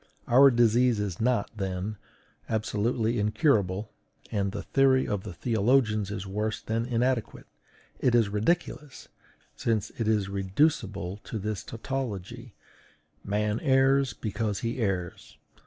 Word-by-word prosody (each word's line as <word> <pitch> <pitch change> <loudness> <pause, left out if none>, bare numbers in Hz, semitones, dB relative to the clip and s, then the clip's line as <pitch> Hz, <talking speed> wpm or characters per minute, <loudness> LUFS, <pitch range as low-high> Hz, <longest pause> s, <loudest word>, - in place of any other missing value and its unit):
Our 135 +3 +7
disease 120 -1 +3
is 100 -3 -3
not, 115 -3 +1
then, 95 +1 -3 0.5
absolutely 110 +1 0
incurable, 105 - +1 0.4
and 100 -2 0
the 100 -1 -5
theory 135 +2 +3
of 105 -2 -1
the 100 - -7
theologians 110 0 +1
is 100 -2 -5
worse 105 +3 -2
than 115 +1 -2
inadequate; 125 -1 -1 0.5
it 125 -2 +2
is 115 -3 +4
ridiculous, 145 +7 -2 0.5
since 110 -3 -1
it 115 - 0
is 105 -3 +2
reducible 100 - 0
to 115 - -4
this 105 -1 -3
tautology: 115 -2 -5 0.7
"Man 105 +2 -1
errs, 135 -1 +3
because 105 -2 -3
he 115 +2 -3
errs." 95 -6 -3
110 Hz, 125 wpm, -27 LUFS, 100-125 Hz, 0.7 s, Our